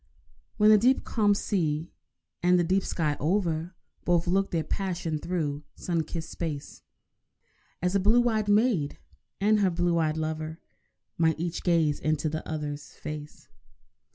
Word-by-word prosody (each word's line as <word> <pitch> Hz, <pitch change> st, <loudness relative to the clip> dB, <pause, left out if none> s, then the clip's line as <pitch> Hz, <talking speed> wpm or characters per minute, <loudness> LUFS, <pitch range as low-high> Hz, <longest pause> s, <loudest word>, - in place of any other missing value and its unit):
When 210 Hz, +1 st, +6 dB
the 215 Hz, -, +7 dB
deep 255 Hz, +5 st, +3 dB
calm 205 Hz, -3 st, +2 dB
sea 165 Hz, -6 st, -1 dB, 0.5 s
and 180 Hz, +1 st, +4 dB
the 175 Hz, -, +3 dB
deep 190 Hz, +3 st, +2 dB
sky 155 Hz, -4 st, -1 dB
over 170 Hz, 0 st, 0 dB, 0.3 s
Both 175 Hz, -1 st, +2 dB
look 195 Hz, +2 st, +1 dB
their 165 Hz, -2 st, 0 dB
passion 170 Hz, -2 st, -2 dB
through 150 Hz, -4 st, -2 dB
sun 165 Hz, -3 st, -1 dB
kissed 160 Hz, 0 st, -6 dB
space, 155 Hz, -4 st, -5 dB, 1.0 s
As 180 Hz, +1 st, +1 dB
a 200 Hz, -, +3 dB
blue 235 Hz, +5 st, +4 dB
eyed 215 Hz, -3 st, 0 dB
maid 205 Hz, -, +2 dB, 0.4 s
and 210 Hz, +2 st, +3 dB
her 195 Hz, -2 st, +3 dB
blue 175 Hz, -1 st, +1 dB
eyed 155 Hz, -1 st, +1 dB
lover 155 Hz, +1 st, -3 dB, 0.6 s
Might 160 Hz, -2 st, +2 dB
each 170 Hz, 0 st, -3 dB
gaze 165 Hz, -4 st, +2 dB
into 155 Hz, 0 st, 0 dB
the 155 Hz, +1 st, -3 dB
other's 150 Hz, -2 st, -5 dB
face. 150 Hz, 0 st, -8 dB
170 Hz, 150 wpm, -27 LUFS, 155-195 Hz, 1.0 s, the